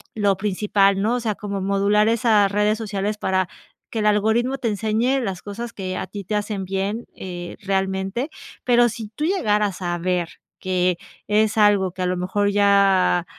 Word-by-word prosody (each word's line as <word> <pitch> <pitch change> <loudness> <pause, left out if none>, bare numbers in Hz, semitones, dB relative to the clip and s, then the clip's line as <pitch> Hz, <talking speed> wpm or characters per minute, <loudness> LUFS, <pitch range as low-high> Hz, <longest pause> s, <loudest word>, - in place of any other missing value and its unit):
lo 205 -2 +2
principal, 200 -1 +2
¿no? 225 +4 +1
O - - -1
sea, 220 -2 -1
como 200 -1 -5
modular 200 +2 +2
esas 220 -3 +3
redes 210 +1 +2
sociales 210 -1 -3
para 190 -3 0 0.4
que 225 - -3
el 210 - 0
algoritmo 220 +5 +2
te 245 - -1
enseñe 220 +5 0
las 195 -6 -4
cosas 230 +3 -6
que 185 -2 -4
a - - -3
ti 205 -1 -7
te 210 +4 -3
hacen 205 -1 -2
bien, 195 +5 -3
eh, 175 -2 -7
realmente. 195 +6 -1 0.3
Pero 240 -1 +4
si 225 -1 -6
tú 295 +8 -4
llegaras 210 - 0
a 175 -1 -1
ver 175 -1 -1 0.3
que 180 -1 0 0.3
es 215 +1 +2
algo 205 -3 +4
que 185 +1 -4
a - - 0
lo 180 0 0
mejor 195 +3 0
ya, 200 -3 +3
205 Hz, 180 wpm, -22 LUFS, 190-215 Hz, 0.4 s, Pero